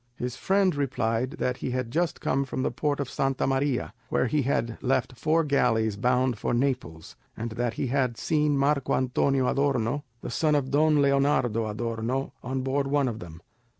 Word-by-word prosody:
His 125 0 -4
friend 195 -1 +2
replied 130 -2 -1
that 125 -6 -2
he - - -4
had 125 -2 -2
just 170 +4 -1
come 140 - +1
from 130 -1 -3
the - - 0
port 145 +3 -1
of 140 - -2
Santa 135 0 -1
Maria, 135 -1 0 0.2
where - - +1
he 145 +4 +1
had 120 -3 -1
left 130 0 0
four 160 +6 +2
galleys 115 -7 +2
bound 125 +1 +1
for - - 0
Naples, 125 - -2 0.2
and 115 +1 -4
that 120 +1 -2
he - - -1
had 130 -2 0
seen 150 -2 +1
Marco 140 0 +2
Antonio 130 +1 +1
Adorno, 140 -1 0 0.2
the - - -6
son 150 +4 +2
of 135 -2 0
Don 150 0 +4
Leonardo 140 -5 +2
Adorno, 115 +4 -3
on 130 +1 -3
board 135 +1 0
one 140 -1 +2
of 115 -2 -3
them. 85 -2 -10
130 Hz, 185 wpm, -27 LUFS, 120-140 Hz, 0.2 s, Don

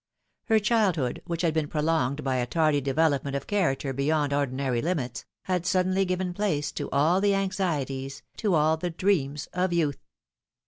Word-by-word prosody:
Her 225 -2 +4
childhood, 205 - +1
which 170 0 -2
had 165 -2 +2
been 155 -2 0
prolonged 150 -2 0
by 130 -1 0
a 125 -1 -1
tardy 155 -1 +2
development 140 0 +1
of 140 - -3
character 145 -9 0
be 140 +1 -2
yond 150 -2 +1
ordinary 135 -3 0
limits, 135 -8 -2 0.2
had 180 -2 -1
suddenly 185 +1 +2
given 185 0 -2
place 155 -7 -1
to - - -5
all 160 +7 +3
tlie 200 -1 +3
anxieties, 150 -9 -2
to 205 -6 +1
all 155 +1 +3
the 175 +2 -3
dreams 160 -5 0
of 180 +1 0
youth. 155 -5 0
155 Hz, 170 wpm, -27 LUFS, 140-185 Hz, 0.2 s, Her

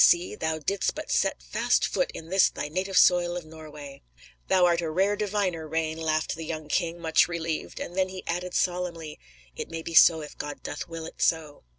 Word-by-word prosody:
See; 175 +1 +4
thou 160 0 -2
didst 195 +6 -1
but - - -6
set - - +1
fast - - +1
foot - - 0
in 165 - -8
this 190 0 +5
thy 150 - -5
native 185 +4 -2
soil 175 -1 +5
of 175 - -7
Norway." 150 -3 -11 0.5
"Thou 185 -1 +4
art 170 -1 +3
a 165 - -2
rare 190 +6 +2
diviner, 200 -6 -1
Rane," 160 0 -2
laughed 155 -1 0
the 165 - -6
young 155 -1 -5
king, 170 +1 0
much 160 -1 +3
relieved, 165 -2 -4
and 175 - -6
then 190 0 +1
he 185 0 -8
added 180 +1 -3
solemnly: 175 -4 -2 0.4
"It - - -6
may 165 0 -5
be 165 - -6
so 160 0 +7
if 150 - -10
God 145 0 -6
doth - - -5
will 165 -1 -7
it - - -10
so." 155 - 0
165 Hz, 210 wpm, -27 LUFS, 160-180 Hz, 0.5 s, so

